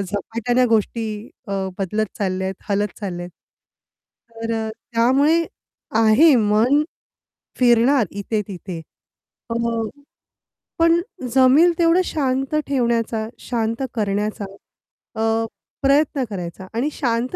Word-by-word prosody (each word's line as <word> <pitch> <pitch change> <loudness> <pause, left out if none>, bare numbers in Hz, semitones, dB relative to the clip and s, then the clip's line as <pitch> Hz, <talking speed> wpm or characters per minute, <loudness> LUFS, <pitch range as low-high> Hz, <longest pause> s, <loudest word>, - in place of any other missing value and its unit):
झपाट्याने 225 +6 0
गोष्टी 225 0 +1 0.4
अ, 200 - -5 0.3
बदलत 210 +3 -1
चालल्यात, 190 -1 -1
हलत 205 +1 +1
चालल्यात. 175 -3 -4 1.0
तर 230 0 -4
अ, - - -4 0.2
त्यामुळे 280 +8 +3 0.5
आहे, 225 +8 +6
मन 225 +7 +3 0.8
फिरणार 240 0 +4
इथे-तिथे 200 -4 -4 0.7
अ, 230 - -1 1.3
पण 335 +1 +5 0.4
जमेल 265 +7 +6
तेवढं 340 +1 +4
शांत 270 -1 -1
ठेवण्याचा, 235 -4 0
शांत 230 +1 -2
करण्याचा 210 0 -1 0.8
अ, 225 0 +1 0.4
प्रयत्न 280 0 +3
करायचा 185 -1 -6
आणि 245 +6 0
शांत 240 -1 -1
230 Hz, 95 wpm, -21 LUFS, 210-265 Hz, 1.3 s, आहे